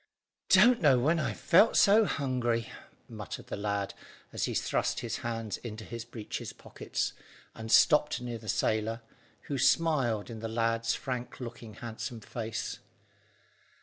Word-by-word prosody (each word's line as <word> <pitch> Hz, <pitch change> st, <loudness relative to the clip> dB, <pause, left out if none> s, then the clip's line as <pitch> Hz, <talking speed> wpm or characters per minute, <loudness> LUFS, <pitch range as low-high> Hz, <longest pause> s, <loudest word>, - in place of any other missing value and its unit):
"Don't 245 Hz, 0 st, +6 dB
know 140 Hz, -6 st, +5 dB
when 155 Hz, +7 st, +2 dB
I 130 Hz, -8 st, -1 dB
felt 195 Hz, +6 st, +4 dB
so 215 Hz, +2 st, +6 dB
hungry," 125 Hz, -, -1 dB, 0.4 s
muttered -, -, -7 dB
the -, -, -3 dB
lad, 100 Hz, -1 st, -2 dB, 0.4 s
as -, -, 0 dB
he -, -, -3 dB
thrust -, -, 0 dB
his -, -, -3 dB
hands 115 Hz, -4 st, -4 dB
into 110 Hz, -2 st, -8 dB
his 115 Hz, 0 st, -7 dB
breeches 115 Hz, -2 st, -6 dB
pockets, -, -, -4 dB, 0.4 s
and 110 Hz, 0 st, -7 dB
stopped 150 Hz, -1 st, +5 dB
near 120 Hz, -2 st, -5 dB
the 110 Hz, -1 st, -9 dB
sailor, 110 Hz, +3 st, 0 dB, 0.4 s
who 140 Hz, -2 st, -4 dB
smiled 125 Hz, -10 st, +2 dB
in 115 Hz, -, -7 dB
the 115 Hz, -, -4 dB
lad's 115 Hz, 0 st, 0 dB
frank 125 Hz, -2 st, -5 dB
looking, 115 Hz, -3 st, -8 dB
handsome 115 Hz, +1 st, -6 dB
face. 110 Hz, +1 st, -5 dB
115 Hz, 145 wpm, -30 LUFS, 110-130 Hz, 0.4 s, Don't